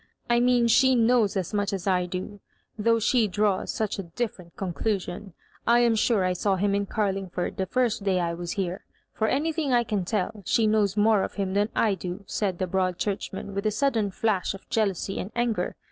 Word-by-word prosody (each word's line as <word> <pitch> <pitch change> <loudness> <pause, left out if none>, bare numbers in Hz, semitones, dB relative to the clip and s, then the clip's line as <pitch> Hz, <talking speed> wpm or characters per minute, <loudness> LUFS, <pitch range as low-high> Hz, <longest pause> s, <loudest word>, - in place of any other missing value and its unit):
"I 240 - +4
mean 245 -1 +3
she 260 +3 +5
knows 230 -3 +3
as 185 0 -3
much 205 -1 0
as 195 -3 -4
I 180 -2 +1
do, 185 +3 -5 0.4
though 230 +1 +2
she 230 0 +2
draws 205 0 0
sudi 215 -2 -2
a - - -3
different 185 -8 -4
conduaion. 190 0 -3 0.3
I 235 +1 +5
am 235 -1 +4
sure 215 -3 +2
I 185 - +1
saw 195 +2 +1
him 200 +2 +1
in 200 0 0
Oarlingford 195 -4 -2
the 190 - -1
first 245 -4 0
day 190 -2 +1
I 170 -1 -1
was 170 0 -4
hera 190 -1 -2 0.3
For 220 - 0
anything 305 0 0
I 240 -1 +4
can 210 -4 -1
tell, 205 +2 -2
she 225 +5 +2
knows 210 -2 +2
more 210 -1 +4
of - - -4
him 195 -2 -2
than 205 +2 +1
I 215 -3 +3
do," 185 +1 -6
said 190 -2 -2
the 185 - -1
Broad 185 -1 0
Church 200 -2 -2
man,, 195 +1 -7
with 200 +2 -1
a - - +4
sudden 225 -3 +1
flitsh 195 -1 0
of 195 - -14
jealousy 195 -3 0
and 190 - -4
anger. 235 -2 -1
205 Hz, 210 wpm, -26 LUFS, 190-225 Hz, 0.4 s, she